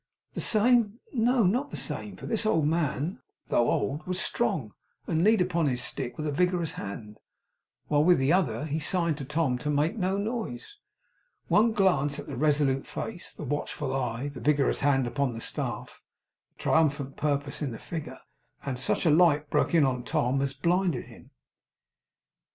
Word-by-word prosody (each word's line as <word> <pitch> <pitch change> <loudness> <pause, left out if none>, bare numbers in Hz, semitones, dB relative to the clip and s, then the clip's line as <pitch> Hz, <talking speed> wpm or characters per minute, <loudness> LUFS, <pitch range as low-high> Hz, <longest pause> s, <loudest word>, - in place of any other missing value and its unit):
The - - -3
same? 230 0 +3
No, 245 0 +3
not 245 +10 +1
the - - -5
same, - - -3
for - - -10
this 225 - 0
old 165 -8 +2
man, 155 -1 -1 0.3
though 120 - +3
old, 150 +4 -1
was 185 0 -1
strong, 160 - -1 0.3
and 160 +1 0
leaned 215 -2 +5
upon 170 -3 0
his 125 -3 -1
stick 125 -1 -3
with 155 - -4
a 150 - -1
vigorous 180 +1 +1
hand, 105 +1 -7 0.7
while 145 0 +3
with 180 +2 +5
the 135 +4 +2
other 145 -9 +1
he 155 +1 -2
signed 170 -1 0
to 135 - -5
Tom 150 -3 0
to 150 - -3
make 150 +6 +1
no 190 -2 0
noise. 240 - -4 0.7
One 220 +2 +4
glance 180 -9 +2
at - - -7
the 145 - -6
resolute 145 -1 +1
face, 195 -5 -5
the - - -9
watchful 145 -1 -3
eye, 125 +1 -2
the 135 -4 -9
vigorous 145 +2 +2
hand 135 -2 +2
upon 130 0 -1
the - - -5
staff, - - -4 0.6
the - - -11
triumphant 140 -4 +1
purpose 145 0 -2
in 145 - -1
the 115 - -6
figure, 160 +4 -6 0.5
and 130 -3 -3
such 135 - 0
a 160 - +5
light 150 -2 +4
broke - - +2
in 155 -4 +5
on 125 -2 0
Tom 125 +2 0
as 140 -1 -2
blinded 175 -5 0
him. - - -15
150 Hz, 180 wpm, -28 LUFS, 135-180 Hz, 0.7 s, leaned